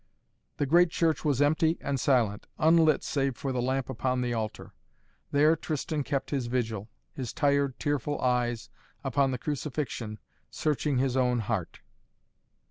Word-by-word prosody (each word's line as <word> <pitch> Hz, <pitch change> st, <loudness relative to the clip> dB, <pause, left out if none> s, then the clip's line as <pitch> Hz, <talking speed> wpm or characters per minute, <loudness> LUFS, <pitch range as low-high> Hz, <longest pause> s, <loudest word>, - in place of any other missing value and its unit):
The 145 Hz, -, +1 dB
great 170 Hz, +5 st, +5 dB
church 160 Hz, -2 st, +1 dB
was 145 Hz, -2 st, +2 dB
empty 160 Hz, +3 st, +2 dB
and 135 Hz, -1 st, -2 dB
silent, 120 Hz, -6 st, +1 dB
unlit 160 Hz, -1 st, +4 dB
save 135 Hz, -4 st, -1 dB
for 135 Hz, -, -3 dB
the 125 Hz, -1 st, -1 dB
lamp 130 Hz, +1 st, -1 dB
upon 130 Hz, 0 st, -1 dB
the 120 Hz, -1 st, -1 dB
altar. 110 Hz, -2 st, -4 dB, 0.6 s
There 150 Hz, +3 st, +4 dB
Tristan 155 Hz, -1 st, -3 dB
kept 135 Hz, 0 st, -2 dB
his 135 Hz, -4 st, -1 dB
vigil, 110 Hz, -4 st, -2 dB, 0.2 s
his 125 Hz, -5 st, -5 dB
tired, 140 Hz, -2 st, +1 dB
tearful 145 Hz, 0 st, -1 dB
eyes 120 Hz, -2 st, 0 dB, 0.3 s
upon 135 Hz, 0 st, +2 dB
the 130 Hz, -, -2 dB
crucifixion, 130 Hz, -6 st, -4 dB, 0.3 s
searching 150 Hz, -2 st, 0 dB
his 130 Hz, 0 st, +1 dB
own 125 Hz, -2 st, +2 dB
heart. 105 Hz, -5 st, -3 dB
135 Hz, 145 wpm, -28 LUFS, 125-145 Hz, 0.6 s, great